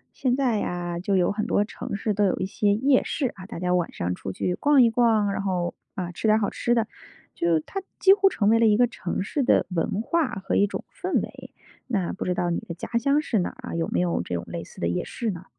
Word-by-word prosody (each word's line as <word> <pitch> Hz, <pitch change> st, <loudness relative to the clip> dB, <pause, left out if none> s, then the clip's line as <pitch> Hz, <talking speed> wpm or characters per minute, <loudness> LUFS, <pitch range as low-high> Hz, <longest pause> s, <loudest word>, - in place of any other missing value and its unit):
现 250 Hz, -2 st, +1 dB
在 250 Hz, -6 st, +1 dB
呀， 175 Hz, -2 st, -3 dB
就 195 Hz, +2 st, 0 dB
有 180 Hz, -2 st, +3 dB
很 210 Hz, +1 st, -2 dB
多 205 Hz, -, +2 dB
城 205 Hz, -, -6 dB
市 215 Hz, +1 st, -1 dB
都 205 Hz, +1 st, +1 dB
有 190 Hz, -, +1 dB
一 -, -, -1 dB
些 205 Hz, +1 st, +1 dB
夜 260 Hz, +4 st, +3 dB
市。 270 Hz, -5 st, -1 dB
啊， 185 Hz, -, -10 dB
大 220 Hz, -, -7 dB
家 180 Hz, 0 st, 0 dB
晚 175 Hz, -2 st, 0 dB
上 90 Hz, +1 st, -2 dB
出 95 Hz, +2 st, -6 dB
去 180 Hz, -, -1 dB
逛 285 Hz, +1 st, +5 dB
一 230 Hz, -, +4 dB
逛， 225 Hz, -3 st, +3 dB
然 -, -, -2 dB
后， 180 Hz, -3 st, -1 dB, 0.2 s
嗯， 180 Hz, -2 st, -4 dB
吃 220 Hz, -, -2 dB
点 215 Hz, 0 st, +5 dB
儿 -, -, +1 dB
好 205 Hz, -, 0 dB
吃 240 Hz, -, 0 dB
的。 230 Hz, -2 st, +1 dB, 0.5 s
就 170 Hz, -1 st, +2 dB
它 390 Hz, -, -5 dB, 0.2 s
几 385 Hz, -, +7 dB
乎 395 Hz, -1 st, +4 dB
成 205 Hz, -, 0 dB
为 225 Hz, +2 st, +5 dB
了 230 Hz, -, +5 dB
一 210 Hz, 0 st, +4 dB
个 245 Hz, -, +5 dB
城 190 Hz, -5 st, -4 dB
市 285 Hz, +8 st, -2 dB
的 255 Hz, -, +3 dB
文 180 Hz, +5 st, -1 dB
化 330 Hz, -2 st, +1 dB, 0.2 s
和 -, -, 0 dB
一 205 Hz, -, +4 dB
种 -, -, -6 dB
氛 -, -, 0 dB
围。 -, -, -8 dB, 0.4 s
那 200 Hz, -8 st, -1 dB
不 -, -, -5 dB
知 180 Hz, -1 st, 0 dB
道 175 Hz, -1 st, 0 dB
你 170 Hz, -, 0 dB
的 170 Hz, -, -8 dB
家 -, -, -6 dB
乡 280 Hz, +4 st, +2 dB
是 230 Hz, -8 st, 0 dB
哪 175 Hz, -, 0 dB
儿 255 Hz, -1 st, -10 dB
啊？ -, -, -4 dB
有 165 Hz, -1 st, -1 dB
没 -, -, -1 dB
有 175 Hz, -, 0 dB
这 90 Hz, +1 st, -4 dB
种 85 Hz, -, -3 dB
类 -, -, -5 dB
似 -, -, -14 dB
的 85 Hz, -, 0 dB
夜 85 Hz, +1 st, -1 dB
市 230 Hz, -3 st, -3 dB
呢？ 175 Hz, -1 st, -8 dB
205 Hz, 295 characters per minute, -25 LUFS, 175-240 Hz, 0.5 s, 几